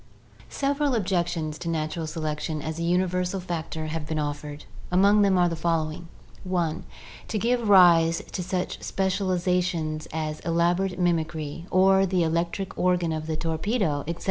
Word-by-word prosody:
Several 280 -1 0
objections 175 -6 -1
to 170 - -4
natural 160 0 -2
selection 155 0 -3
as 160 +2 -5
a - - -3
universal 180 +2 0
factor 165 -3 -4
have 155 -1 -4
been 155 0 -2
offered. 145 0 -4 0.3
Among 200 +3 +5
them 195 -2 +4
are 175 -1 +4
the 170 - -2
following: 160 0 -1 0.4
(1) 175 -4 -1 0.4
To 220 - -2
give 235 +1 0
rise 170 -4 +6
to 185 - -3
such 180 0 -3
specializations 180 -4 -1
as 155 -1 -3
elaborate 175 +2 +1
mimicry, 165 -2 -1
or 190 +1 +4
the 180 -1 +1
electric 170 +4 -1
organ 180 -2 +2
of 155 0 -3
the 160 -1 -2
torpedo, 165 0 -1
etc. 170 0 -4
170 Hz, 145 wpm, -26 LUFS, 160-185 Hz, 0.4 s, rise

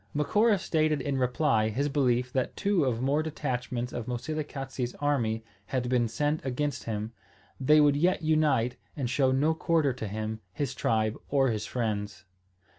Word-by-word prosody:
Macora 210 +9 +3
stated 155 -4 +1
in 135 0 -1
reply 125 -3 +2
his 135 +7 0
belief 125 -3 +1
that 130 -2 -1
two 195 -7 +2
of 125 -2 -1
more 140 +3 +2
detachments 125 -5 -3
of 120 -1 -4
Moselekatse's 135 -1 -4
army 120 -7 0 0.2
had 125 -2 -1
been 125 -2 +2
sent 145 +7 -1
against 140 +2 -2
him. 110 0 -3 0.5
They 150 +3 +5
would 145 -1 +5
yet 175 +4 +2
unite 145 -6 +2 0.2
and 135 -4 -2
show 130 +2 +2
no 145 +5 +2
quarter 160 -4 +1
to 110 -3 -5
him, 110 +2 -4
his 140 +2 -2
tribe, 110 -1 0
or 135 -2 +3
his 110 -2 -2
friends. 105 -6 -3
130 Hz, 160 wpm, -28 LUFS, 120-150 Hz, 0.5 s, They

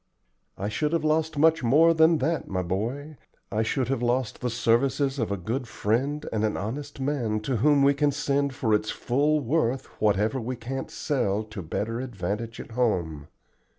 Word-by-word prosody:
"I 100 - -3
should 150 +9 -1
have 165 - +1
lost 155 0 +1
much 160 +2 +4
more 150 +8 +5
than 160 0 +5
that, 160 +3 -1
my 90 -1 -2
boy, 120 - -3 0.3
I 105 +2 +1
should 125 +3 0
have 135 -3 0
lost 120 -1 -1
the 125 - -1
services 135 +4 +1
of 115 -3 -1
a 100 - -1
good 120 +8 -3
friend 135 +9 -1
and 110 -1 0
an 110 - 0
honest 140 +8 -5
man 130 -6 -1
to 125 +3 -1
whom 140 +4 +4
we 140 +1 +5
can 145 +1 +2
send 140 -1 0
for 110 -4 0
its 105 0 +1
full 145 +4 +1
worth 130 -1 0 0.2
whatever 105 +5 +2
we 125 +3 -3
can't 125 +3 -5
sell 110 -7 -1
to 110 -2 -8
better 110 +8 -3
advantage 110 -1 -4
at - - -9
home. 85 -11 -1
125 Hz, 185 wpm, -26 LUFS, 110-145 Hz, 0.3 s, more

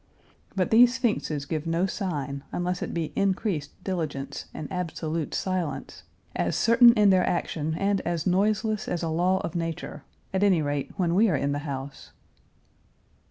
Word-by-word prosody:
But 185 -2 0
these 240 +2 +6
sphinxes 210 - -1
give 155 +1 -3
no 165 +3 +1
sign, 145 -9 -3
unless 180 0 -2
it - - -3
be 165 -2 -3
increased 190 -6 -1
diligence 145 -7 -3
and 155 - -6
absolute 165 -3 -3
silence, 185 -5 -3 0.3
as 85 0 0
certain 235 +1 +7
in 210 -3 +5
their 185 -1 +4
action 160 -3 -1
and 195 +2 +1
as 170 -2 -2
noiseless 215 +3 +1
as 175 -1 -2
a 165 - -1
law 180 +4 +2
of 170 - -4
nature, 165 -4 -4 0.3
at 190 - +1
any 190 -6 +4
rate 145 -1 -2
when 175 -3 +1
we 210 +4 +4
are 155 - +2
in 140 +1 0
the 145 - -1
house. 135 0 -7
175 Hz, 160 wpm, -26 LUFS, 150-195 Hz, 0.3 s, certain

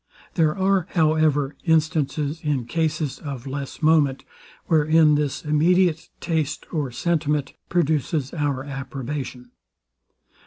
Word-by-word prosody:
There 160 -1 +2
are, 190 -2 +2
however, 155 -3 +2
instances, 155 -2 +1
in 145 -5 -1
cases 155 0 -1
of 140 -4 -6
less 140 +2 -6
moment, 150 -4 +3 0.4
wherein 155 0 +4
this 145 0 -1
immediate 165 +2 +2
taste 160 -4 -2
or 150 -5 -1
sentiment 150 -1 -1 0.2
produces 155 -4 0
our 145 -5 -1
approbation. 135 -2 -6
150 Hz, 105 wpm, -23 LUFS, 140-160 Hz, 0.4 s, wherein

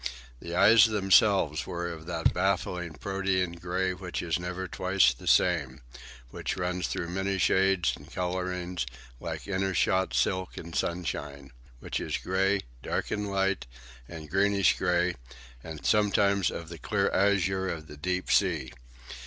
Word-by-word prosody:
The 85 +4 -6
eyes 105 +4 +7
themselves 95 - +3
were 85 0 -3
of 80 -2 -8
that 85 -2 +1
baffling 90 -2 -1
protean 95 +1 -1
grey 90 +2 -2
which 90 -1 -5
is 85 0 -1
never 90 +1 -4
twice 90 -9 +2
the - - -12
same; 70 -8 +2 0.5
which - - -4
runs 90 0 -1
through 85 - -3
many 95 +2 -1
shades 95 -2 +2
and - - -15
colourings 90 -3 -3 0.3
like - - -5
intershot 95 -1 0
silk 95 -1 0
in 85 0 -8
sunshine; 70 -6 -3 0.3
which - - -3
is - - -2
grey, 95 +1 +1 0.2
dark - - -3
and 105 -1 -2
light, 95 -6 0 0.4
and 80 -3 -9
greenish 100 +1 +3
grey, 90 -1 +1 0.5
and 80 -2 -8
sometimes 100 -3 +3
of 85 -1 -7
the 85 -1 -9
clear - - 0
azure 95 -1 +2
of 80 -3 -5
the 75 - -11
deep 90 +4 -2
sea. 80 -10 +2
90 Hz, 145 wpm, -28 LUFS, 85-95 Hz, 0.5 s, eyes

